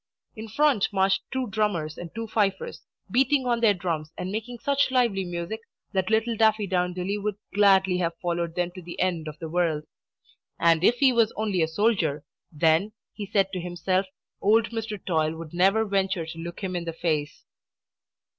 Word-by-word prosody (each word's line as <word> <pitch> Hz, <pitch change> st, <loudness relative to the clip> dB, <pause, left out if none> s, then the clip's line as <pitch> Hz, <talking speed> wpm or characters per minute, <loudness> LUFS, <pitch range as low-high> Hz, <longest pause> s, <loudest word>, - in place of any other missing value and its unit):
In 220 Hz, 0 st, -7 dB
front 260 Hz, -2 st, +2 dB
marched 195 Hz, -1 st, +2 dB
two 260 Hz, -1 st, -1 dB
drummers 185 Hz, -8 st, -1 dB
and 175 Hz, -, -7 dB
two 230 Hz, 0 st, -3 dB
fifers, 205 Hz, -3 st, -1 dB, 0.3 s
beating 265 Hz, +3 st, +3 dB
on 240 Hz, -1 st, +1 dB
their 215 Hz, -3 st, +5 dB
drums 165 Hz, -4 st, -3 dB
and 185 Hz, -, -4 dB
making 225 Hz, +3 st, -4 dB
such 280 Hz, +3 st, +1 dB
lively 240 Hz, -7 st, +2 dB
music 175 Hz, +4 st, -4 dB, 0.3 s
that 190 Hz, -2 st, 0 dB
little 225 Hz, +1 st, +1 dB
Daffydowndilly 195 Hz, -3 st, +1 dB
would 210 Hz, 0 st, -2 dB, 0.2 s
gladly 195 Hz, -2 st, +4 dB
have 170 Hz, -1 st, -1 dB
followed 170 Hz, -1 st, -2 dB
them 175 Hz, 0 st, -1 dB
to 185 Hz, +1 st, -10 dB
the 170 Hz, 0 st, -9 dB
end 175 Hz, -4 st, 0 dB
of 155 Hz, 0 st, -7 dB
the 165 Hz, -, -6 dB
world. 160 Hz, -2 st, 0 dB, 0.8 s
And 165 Hz, 0 st, +4 dB
if 235 Hz, -, +5 dB
he 260 Hz, 0 st, +4 dB
was 230 Hz, -2 st, +3 dB
only 205 Hz, -5 st, 0 dB
a 160 Hz, -, +3 dB
soldier, 160 Hz, -5 st, +1 dB, 0.3 s
then, 165 Hz, +6 st, +2 dB, 0.2 s
he 205 Hz, -2 st, -6 dB
said 195 Hz, -1 st, +1 dB
to 185 Hz, -, -2 dB
himself, 185 Hz, +2 st, -1 dB, 0.3 s
old 220 Hz, +3 st, +3 dB
Mr. 225 Hz, -2 st, -4 dB
Toil 160 Hz, -2 st, +1 dB
would 165 Hz, -1 st, -9 dB
never 195 Hz, +5 st, +3 dB
venture 190 Hz, -4 st, 0 dB
to 165 Hz, 0 st, -8 dB
look 170 Hz, +3 st, -7 dB
him 185 Hz, -1 st, -2 dB
in 175 Hz, -1 st, -3 dB
the 165 Hz, -, -4 dB
face. 155 Hz, -3 st, -2 dB
190 Hz, 180 wpm, -26 LUFS, 170-220 Hz, 0.8 s, their